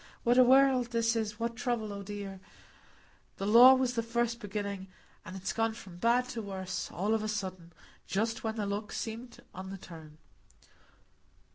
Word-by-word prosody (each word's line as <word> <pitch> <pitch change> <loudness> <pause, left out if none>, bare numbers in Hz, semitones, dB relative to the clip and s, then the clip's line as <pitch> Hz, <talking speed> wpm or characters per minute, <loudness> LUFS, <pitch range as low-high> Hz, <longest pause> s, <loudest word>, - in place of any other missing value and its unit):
What 240 +1 +4
a - - +9
world 260 -1 +5
this 230 -1 +1
is,—what 225 +1 -2
trouble, 235 -4 -2
oh 200 - -6
dear! 200 -1 -7 1.0
The 195 - -3
law 240 +5 +9
was 255 -1 0
the 230 - 0
first 235 0 -1
beginning, 200 -2 -4 0.4
and 185 - -9
it's 190 0 -3
gone 225 0 0
from 185 -6 -11
bad 235 +5 +3
to 235 -2 -4
worse, 190 -3 -4
all 205 +5 -1
of 220 - +1
a 215 - -2
sudden, 185 -5 -4 0.4
just 225 +3 -1
when 220 -1 -2
the 215 -2 -2
luck 205 +1 -3
seemed 235 +2 -6
on 190 +1 -7
the 195 - -6
turn." 160 -4 -12
215 Hz, 170 wpm, -31 LUFS, 195-235 Hz, 1.0 s, a